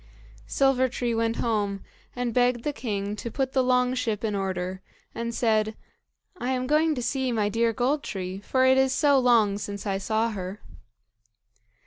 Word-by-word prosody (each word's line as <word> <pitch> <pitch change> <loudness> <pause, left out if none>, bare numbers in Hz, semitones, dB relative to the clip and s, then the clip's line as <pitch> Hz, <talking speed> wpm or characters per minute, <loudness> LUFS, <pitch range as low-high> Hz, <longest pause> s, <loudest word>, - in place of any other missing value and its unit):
Silver 260 -1 +2
tree 240 -1 -2
went 225 0 0
home, 205 -4 -1 0.3
and 245 -2 -2
begged 245 -1 +2
the 295 - -1
king 205 -5 -3
to 235 - -5
put 265 +2 -2
the 260 - +3
long 250 0 +2
ship 230 -5 -2
in 215 -2 -1
order, 190 -1 -3 0.3
and 235 0 -3
said, 220 -2 +1 0.6
"I 255 +2 -1
am 255 0 -1
going 305 +3 +2
to 245 - -3
see 260 +1 -1
my 215 -3 +1
dear 230 +2 +1
Gold 255 +6 0
tree, 185 -4 -5
for 260 +5 +1
it 260 0 +5
is 265 0 +3
so 285 -1 +4
long 225 -5 +3
since 205 0 -6
I 195 -1 -1
saw 220 +3 0
her." 190 0 -6
235 Hz, 175 wpm, -26 LUFS, 205-255 Hz, 0.6 s, it